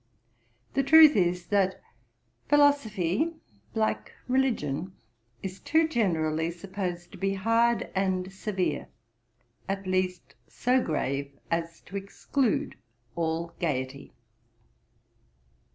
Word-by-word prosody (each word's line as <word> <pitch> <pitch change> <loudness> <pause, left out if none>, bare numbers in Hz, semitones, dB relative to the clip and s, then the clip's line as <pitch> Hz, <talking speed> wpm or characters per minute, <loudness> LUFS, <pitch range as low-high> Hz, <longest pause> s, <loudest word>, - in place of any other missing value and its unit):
The 275 - +3
truth 310 +2 +8
is, 180 -2 +1
that 195 -2 +2 0.7
philosophy, 285 - +3 0.4
like 220 -1 0 0.2
religion, 190 - 0 0.5
is 190 0 -5
too 320 +1 +2
generally 165 - 0
supposed 175 0 -5
to 195 - -12
be 195 +1 0
hard 230 +4 +2
and 190 -1 -1
severe, 190 -1 -2 0.8
at 195 0 -2
least 185 -1 -1
so 255 +1 +1
grave 140 -2 -2 0.2
as 165 0 -2
to 200 - -7
exclude 215 +5 -1 0.4
all 165 0 -2
gaiety. 140 -4 -3
190 Hz, 95 wpm, -28 LUFS, 170-230 Hz, 0.8 s, truth